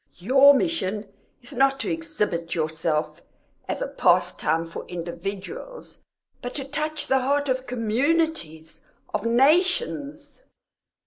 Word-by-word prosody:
"Your 270 +9 +6
mission 215 - -1 0.4
is 250 - -8
not 270 +1 +2
to - - -2
exhibit 210 - -2
yourself 160 -1 -1 0.5
as - - -2
a - - -2
pastime 160 +2 +2
for 165 - -7
individuals, 195 - -7 0.4
but 245 - -6
to 275 - -2
touch 305 +2 -2
the 265 - +2
heart 285 +2 +1
of 260 0 -1
communities, 245 - -1 0.3
of 210 - -1
nations." 290 - +1
260 Hz, 115 wpm, -24 LUFS, 180-300 Hz, 0.5 s, Your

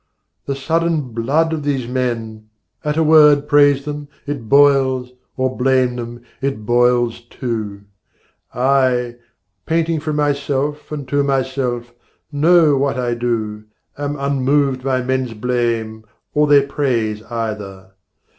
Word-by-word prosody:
The 140 - -1
sudden 160 -1 -1
blood 145 +8 +1
of 155 - -2
these 140 -4 -2
men! 115 -4 -3 0.3
at 150 0 -1
a 160 - +3
word 150 -2 +6
Praise 145 -1 +4
them, 150 -1 -5 0.2
it 140 -7 -5
boils, 135 -3 +4 0.3
or 130 0 -1
blame 130 -1 +2
them, 120 0 -7 0.2
it 135 -6 -3
boils 120 0 +2
too. 110 -5 -4 0.7
I, 125 -2 +1 0.5
painting 165 0 +1
from 155 0 -3
myself 145 0 -1
and 145 -3 -5
to 145 +2 +1
myself, 130 -3 -2 0.4
Know 155 0 +4
what 140 -1 0
I 120 -1 -1
do, 110 -3 -3 0.3
am 145 0 -4
unmoved 140 -1 0
by 130 -1 0
men's 130 -2 -2
blame 115 -1 -2 0.3
Or 150 0 +3
their 145 -1 +5
praise 115 -7 -1
either. 105 -5 -5
130 Hz, 125 wpm, -18 LUFS, 120-145 Hz, 0.7 s, word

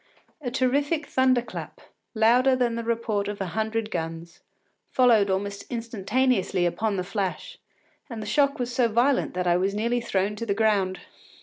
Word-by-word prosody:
A 255 - -3
terrific 280 +5 0
thunder 255 -3 +2
clap, - - -8 0.4
louder 245 +4 +4
than 245 -2 +1
the 230 0 -3
report 225 -3 -1
of 205 0 -5
a 195 - -2
hundred 220 0 -2
guns, 165 0 -5 0.5
followed 230 -6 +4
almost 200 +1 -2
instantaneously 230 -4 0
upon 200 +5 0
the 185 - -1
flash, 190 -3 -4 0.5
and 230 -3 -6
the 215 - -5
shock 280 +7 +2
was 245 -2 -3
so 245 -1 +3
violent 240 0 +1
that 180 0 -1
I 175 0 +3
was 195 +2 0
nearly 235 +3 0
thrown 200 -1 -1
to 230 - -4
the 200 - 0
ground. 200 -4 +1
220 Hz, 170 wpm, -25 LUFS, 195-245 Hz, 0.5 s, louder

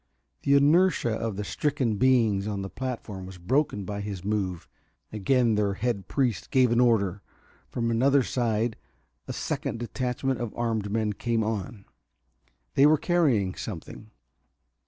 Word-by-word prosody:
The 140 - +3
inertia 150 -2 +4
of 110 -1 -2
the 105 - -3
stricken 130 -3 -1
beings 110 -5 +3
on 100 -2 -3
the 95 - -6
platform 115 -7 -5
was 95 -1 -10
broken 105 - 0
by 100 +1 -4
his 100 -3 -6
move. 95 -5 -2 0.5
Again 115 +3 +2
their 105 -2 +1
head 100 -3 -2
priest 125 - -1
gave 130 -2 +3
an 120 - +3
order; 105 -6 +2 0.5
from 115 -1 -1
another 135 +4 +3
side 115 -2 -1 0.5
a - - -4
second - - -3
detachment 125 +2 -2
of 120 -3 -4
armed 110 -3 -1
men 110 -1 0
came 115 +1 -1
on. 105 -1 -4 0.9
They 140 - +6
were 155 +1 +5
carrying 140 - +2
something. 105 +2 -8
115 Hz, 145 wpm, -27 LUFS, 100-130 Hz, 0.9 s, They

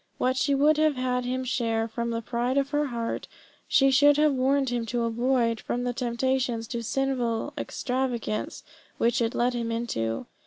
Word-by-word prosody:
What 255 +1 +1
she 280 +2 +2
would 295 +2 +4
have 310 -1 +3
had 250 -1 -1
him 255 +1 -2
share 230 -3 0
from 235 +1 -3
the 230 0 -3
pride 245 +3 -1
of 275 0 +1
her 295 0 +1
heart, 235 -3 -3 0.4
she 270 0 +4
should 290 +2 +5
have 300 -1 +4
warned 270 +1 +2
him 240 -1 -1
to 240 +1 -1
avoid 235 0 +1
from 245 - -2
the 245 0 -1
temptations 245 -1 -1
to 235 -2 -3
sinful 250 +1 -1
extravagance 250 -6 -3 0.3
which 235 +1 +2
it 230 0 0
led 245 +1 +1
him 235 -1 -2
into. 115 - -2
245 Hz, 180 wpm, -26 LUFS, 235-270 Hz, 0.4 s, should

